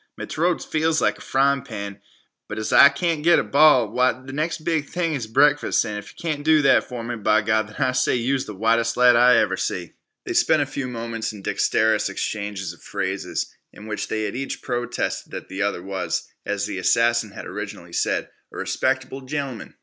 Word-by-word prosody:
Me - - -5
t'roat 170 +2 0
feels 160 0 +1
like - - +1
a - - -14
fryin' 140 0 +2
pan. 100 -3 -7 0.5
But - - -6
as 110 - -2
I 140 - +9
can't 160 +1 -1
get 170 +1 +6
a - - +2
ball, 140 -5 +5
why, 125 +4 +2
th' 130 +1 -11
next 155 +2 -2
bes' 160 -3 0
thing 170 -3 -1
is 125 -6 -3
breakfast, 145 +6 +3
an' 105 -1 -4
if 105 - -13
yeh 160 -3 -1
do 155 +1 +3
that 135 - +4
for 120 -2 -6
me, 120 +1 -4
b'Gawd, 110 0 +1
I 130 -2 +2
say 125 0 +1
yeh 125 +2 0
was 135 - -1
th' 105 - -7
whitest 115 +3 +1
lad 125 -1 +6
I 125 0 +6
ever 95 -3 +2
see." 85 -3 -3 0.3
They - - -3
spent - - +3
a - - -4
few 135 -2 -4
moments 115 -2 -4
in 100 -2 -11
dexterous 110 +2 +1
exchanges 100 -4 -4
of 85 - -19
phrases, - - -3 0.2
in 105 - -13
which 105 -1 -4
they 110 -1 -2
each 130 +6 -5
protested 120 -1 -3
that - - -7
the 95 +1 -5
other 100 -3 -1
was, 95 -3 -3 0.2
as - - -1
the - - -4
assassin 115 -1 +2
had 100 - -9
originally - - -7
said, - - 0 0.2
"a - - -10
respecter'ble 130 0 -2
gentlem'n." 140 -4 -5
120 Hz, 205 wpm, -23 LUFS, 110-140 Hz, 0.5 s, I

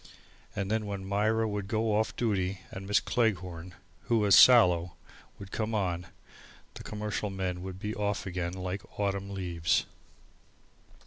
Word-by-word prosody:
And 100 0 -2
then 110 -1 0
when 100 -1 -5
Myra 110 +3 +1
would 105 -2 -3
go 110 +1 0
off 110 +1 0
duty 95 -4 -1
and 95 +1 -7
Miss 105 - +4
Cleghorn, 90 -6 -1 0.3
who 120 -2 +2
was 105 -2 +3
sallow, 90 -9 +7 0.4
would 100 -1 -10
come 110 0 -2
on, 90 -4 -1 0.7
the - - -9
commercial 105 -1 -3
men 95 -2 -3
would 95 0 -6
be 105 +3 -4
off 105 -1 -2
again 90 -2 -3
like 95 +1 -4 0.2
autumn 100 -1 -1
leaves. 90 -4 0
100 Hz, 145 wpm, -29 LUFS, 90-105 Hz, 0.7 s, sallow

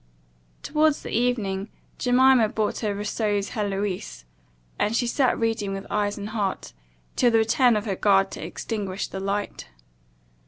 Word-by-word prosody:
Towards 305 0 +2
the - - -6
evening, 215 -5 0 0.3
Jemima 250 -2 +4
brought 215 -1 -1
her 210 -3 -1
Rousseau's 205 0 -1
Heloise; 200 - -3 0.5
and 210 +2 +1
she 245 - +1
sat 255 +2 +1
reading 225 -3 -1
with 195 0 -5
eyes 205 -1 0
and 205 0 -5
heart, 205 -4 -3 0.4
till 245 - +4
the 230 - +3
return 230 +2 +4
of 210 +1 -1
her 200 -3 -1
guard 195 0 +3
to - - -7
extinguish 200 -3 -4
the 190 - -5
light. 200 - -3
210 Hz, 150 wpm, -25 LUFS, 200-235 Hz, 0.5 s, Jemima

